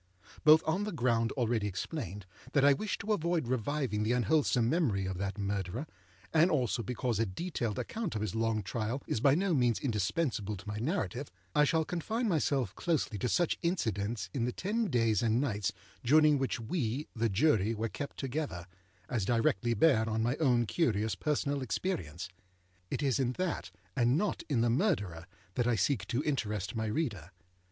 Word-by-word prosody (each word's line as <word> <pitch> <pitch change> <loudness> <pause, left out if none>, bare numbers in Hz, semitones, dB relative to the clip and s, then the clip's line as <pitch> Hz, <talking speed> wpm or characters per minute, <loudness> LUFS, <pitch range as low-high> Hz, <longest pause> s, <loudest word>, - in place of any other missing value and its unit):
Both 155 +1 +7
on 170 +6 +1
the 210 - -3
ground 120 -6 +1
already 115 -5 0
explained, 105 - -5 0.3
that 140 -2 +4
I 145 - +7
wish 205 +9 -2
to 215 +2 -1
avoid 170 - 0
reviving 130 -2 -1
the 110 +3 +1
unwholesome 125 0 +2
memory 120 - +1
of 95 -1 -3
that 100 +2 -3
Murderer, 100 - -2 0.5
and 165 +2 +5
also 125 - +1
because 120 0 -2
a 115 - +3
detailed 115 - -3
account 220 - -3
of 105 - -2
his 110 - -2
long 110 -1 0
trial 115 +6 -3
is - - -1
by 135 +4 +5
no 185 +1 +1
means 120 -5 +2
indispensable 110 - -1
to 100 - -13
my 105 0 -3
narrative, 130 - -2 0.2
I 150 - +5
shall 160 +2 +2
confine 220 +9 -2
myself 140 - +1
closely 155 - -1
to 125 - 0
such 175 +4 +1
incidents 110 - -1
in 120 - 0
the 125 - -1
ten 215 - -1
days 115 -5 +2
and 115 0 +2
nights 105 -8 0 0.3
during 150 +2 +5
which 135 -2 -1
we, 125 +2 -2
the 115 0 +1
Jury, 110 -1 +2
were 110 +1 -1
kept 140 +6 -6
together, 135 - -3 0.4
as 120 -5 -1
directly 115 +1 +1
bear 110 -3 +4
on 110 0 0
my 120 +3 +1
own 125 -6 +3
curious 110 - +1
personal 145 +5 -1
experience. 90 - -3 0.6
It - - -2
is 135 -1 +2
in 130 -2 +1
that, 185 +4 -2 0.3
and 125 +1 +3
not 205 +2 0
in 130 -6 +2
the 120 - +3
Murderer, 105 - 0 0.3
that 120 +2 0
I 120 - +3
seek 110 -3 0
to 125 +5 -1
interest 105 -8 -2
my 110 -1 -1
reader. 105 - -2
120 Hz, 180 wpm, -32 LUFS, 105-150 Hz, 0.6 s, Both